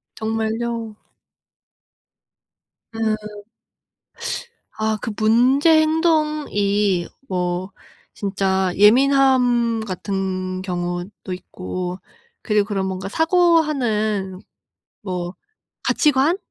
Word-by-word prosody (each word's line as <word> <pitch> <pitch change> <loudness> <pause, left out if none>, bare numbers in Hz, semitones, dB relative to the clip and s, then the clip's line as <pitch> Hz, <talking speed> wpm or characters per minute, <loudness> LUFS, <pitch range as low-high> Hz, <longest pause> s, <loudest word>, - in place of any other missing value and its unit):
정말요? 225 0 -3 2.0
음. 215 -2 -3 1.3
아 220 0 -1
그 225 - -3
문제 260 +9 +4
행동이 300 - +1 0.2
뭐 180 +1 -2 0.4
진짜 190 -2 0
예민함 245 0 +4
같은 185 -2 -3
경우도 180 +1 -4
있고 185 0 -6 0.4
그리고 210 -2 +1
그런 195 -3 -1
뭔가 190 +1 -4
사고하는 260 - +1 0.6
뭐 180 -2 -4 0.5
가치관? 300 +4 +3
215 Hz, 140 characters per minute, -21 LUFS, 190-255 Hz, 2.0 s, 문제